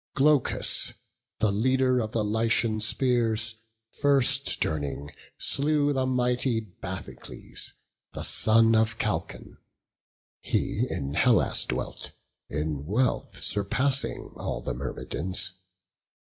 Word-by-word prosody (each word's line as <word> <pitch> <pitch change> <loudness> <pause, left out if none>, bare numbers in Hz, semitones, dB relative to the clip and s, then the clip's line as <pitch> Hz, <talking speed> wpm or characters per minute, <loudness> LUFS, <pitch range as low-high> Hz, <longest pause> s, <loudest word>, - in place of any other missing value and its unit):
Glaucus, 145 -1 +2 0.4
the 110 - +2
leader 130 +4 +2
of 110 -2 -2
the 110 - 0
Lycian 110 +1 +1
spears, 115 -1 +1 0.3
First 140 -1 +1
turning, 70 -2 -2 0.3
slew 145 0 +2
the 130 -1 0
mighty 125 -1 +1
Bathycles, 105 -6 -7 0.4
The - - -5
son 115 +1 +5
of 110 0 +2
Chalcon; - - -3 0.8
he - - 0
in 70 0 -3
Hellas 105 +5 +3
dwelt, - - -4 0.4
In 75 -1 -3
wealth 120 +6 0
surpassing 125 +7 0
all - - -3
the 65 - -2
Myrmidons. 90 +9 -2
115 Hz, 100 wpm, -27 LUFS, 100-130 Hz, 0.8 s, son